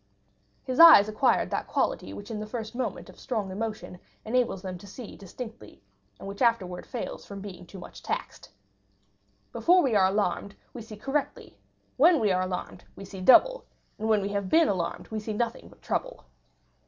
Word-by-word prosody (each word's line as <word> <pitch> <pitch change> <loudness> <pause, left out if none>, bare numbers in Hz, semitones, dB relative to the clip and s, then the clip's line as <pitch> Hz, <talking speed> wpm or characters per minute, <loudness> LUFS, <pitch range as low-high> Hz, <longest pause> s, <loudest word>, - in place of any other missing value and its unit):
His 255 -1 -3
eyes 325 -12 +10
acquired 215 +5 +1
that - - -2
quality - - -1
which 205 +2 -9
in 215 - -4
the 215 - -5
first 225 0 -6
moment 255 +1 -4
of - - -15
strong 215 -6 -3
emotion 210 -3 -5 0.3
enables 230 -4 0
them 185 -2 -6
to 200 - -13
see 225 +3 -9
distinctly, 200 - -10 0.3
and - - -9
which 200 0 -8
afterwards 210 -7 +1
fails 245 - -6
from 200 -1 -9
being 185 -3 -9
too 195 - -11
much 180 - -11
taxed. - - -5 1.0
Before 360 - +4
we 255 -6 +1
are 190 -2 +5
alarmed, 200 0 -1 0.2
we 245 - -7
see 215 -1 -10
correctly; 275 +6 -3 0.4
when 320 +4 +6
we 215 -4 +2
are 185 0 +1
alarmed, 185 -1 -5
we 195 - -9
see 190 -1 -9
double; - - +6 0.4
and 220 +1 -2
when 210 -2 +3
we 200 - -2
have 200 -2 -3
been 325 - +5
alarmed, 175 -4 -3
we 220 - -3
see 215 +1 -5
nothing 230 +2 -3
but - - -21
trouble. - - -3
215 Hz, 185 wpm, -27 LUFS, 195-245 Hz, 1.0 s, eyes